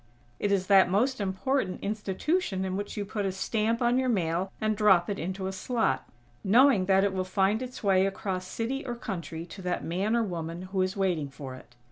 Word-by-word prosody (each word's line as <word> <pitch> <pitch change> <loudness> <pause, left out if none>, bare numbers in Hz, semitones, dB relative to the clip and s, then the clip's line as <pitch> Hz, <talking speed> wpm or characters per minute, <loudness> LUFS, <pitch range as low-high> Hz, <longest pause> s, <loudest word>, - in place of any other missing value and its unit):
It 205 - 0
is 195 -2 +2
that 190 -2 +6
most 235 +6 +1
important 195 +2 -1
institution 210 - -1
in 185 0 -2
which 205 +2 -5
you 205 - -2
put 205 +1 -3
a 195 - 0
stamp 220 +5 0
on 240 +2 +3
your 260 -1 +1
mail 180 -3 0
and 215 0 +1
drop 205 -3 +4
it 200 - -3
into 190 +3 -3
a 190 - -2
slot, 190 - -1 0.3
knowing 230 0 +5
that 190 0 +4
it 200 -1 +1
will 185 -1 -1
find 195 +4 +1
its 255 -2 -7
way 195 -1 +4
across 190 -2 -3
city 255 +7 -3
or 245 -3 -4
country 170 -7 -5
to 190 +3 -10
that 180 -1 -2
man 195 +7 0
or 235 - +2
woman 170 -3 -4
who 190 0 -2
is 185 +2 -1
waiting 175 -7 0
for 135 -1 -8
it. 130 -1 -14
195 Hz, 210 wpm, -28 LUFS, 185-220 Hz, 0.3 s, that